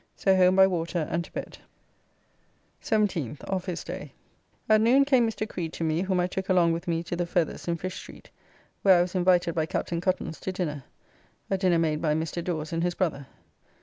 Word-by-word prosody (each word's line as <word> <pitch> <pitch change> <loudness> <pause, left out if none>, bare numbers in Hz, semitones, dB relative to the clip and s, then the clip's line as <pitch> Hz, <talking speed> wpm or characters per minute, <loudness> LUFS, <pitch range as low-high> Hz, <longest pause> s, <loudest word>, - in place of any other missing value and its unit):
So 190 -1 +3
home 185 0 +5
by 190 0 +7
water 170 -3 -1
and 170 - 0
to - - -16
bed. - - -7 1.2
17th. 195 - -1
Office 185 -2 -3
day. - - -7 0.5
At 215 0 +5
noon 260 +5 +5
came 260 -4 +4
Mr. 215 -1 -4
Creed 170 -5 -5
to - - -4
me, 160 +1 +1
whom 190 -1 0
I 180 - +2
took 190 +1 -4
along 175 -3 +4
with 170 +2 -5
me 165 -1 0
to 175 - -4
the 175 0 -2
Feathers 170 -1 -1
in 170 -1 0
Fish 185 +3 -5
Street, - - -12 0.5
where 190 -2 +6
I - - +4
was 180 - -6
invited 180 -2 +3
by 160 -1 -1
Captain 170 0 -2
Cuttance 180 -3 -2
to 190 - -3
dinner, 150 -8 -4 0.7
a 195 - +2
dinner 180 -3 +3
made 155 -2 0
by 150 -2 +1
Mr. 165 +2 -3
Dawes 160 -3 -3
and 165 - 0
his 175 0 0
brother. 145 -7 -2
175 Hz, 205 wpm, -27 LUFS, 165-190 Hz, 1.2 s, by